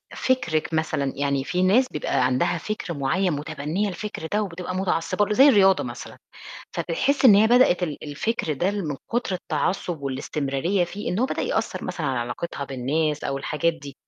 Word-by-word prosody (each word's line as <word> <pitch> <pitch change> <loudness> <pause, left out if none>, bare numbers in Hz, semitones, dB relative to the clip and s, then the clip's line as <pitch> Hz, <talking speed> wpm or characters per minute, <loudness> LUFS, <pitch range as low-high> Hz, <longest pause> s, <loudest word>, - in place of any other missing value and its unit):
فِكرِك 170 -12 0
مثلًا 145 -4 0
يعني 140 -1 0
في 180 +6 -1
ناس 215 +8 +4
بيبقى 145 -3 0
عندها 130 0 +1
فِكر 215 -5 -4
معيّن 165 +7 0
مُتبنية 155 +6 -2
الفِكر 195 -2 -5
ده 210 +1 +2
وبتبقى 180 -2 -5
متعصبة 190 +2 0
ل 210 - -1
زي 270 +6 +7
الرياضة 195 -7 +5
مثلًا، 120 -1 -8 0.6
فبتحسي 270 - +2
إن 210 - +9
هي 215 +2 +5
بدأتِ 235 -7 +4
ال 155 -5 -3
الفِكر 155 +3 -2
ده 175 +7 0
اللي 205 0 -2
من 150 -5 -3 0.2
كُتر 235 -5 0
التعصُب 180 -2 -2
والإستمرارية 140 +6 -1
فيه 200 +4 -5
إن 180 - -1
هو 255 - +3
بدأ - - -3
يأثّر - - -2
مثلًا 155 -4 -3
على 130 -2 -1
علاقتها 120 +6 -4
بالناس 145 +3 -1
أو 135 - -2
الحاجات 160 +4 0
دي. 145 -4 -10
170 Hz, 180 wpm, -24 LUFS, 140-200 Hz, 0.6 s, إن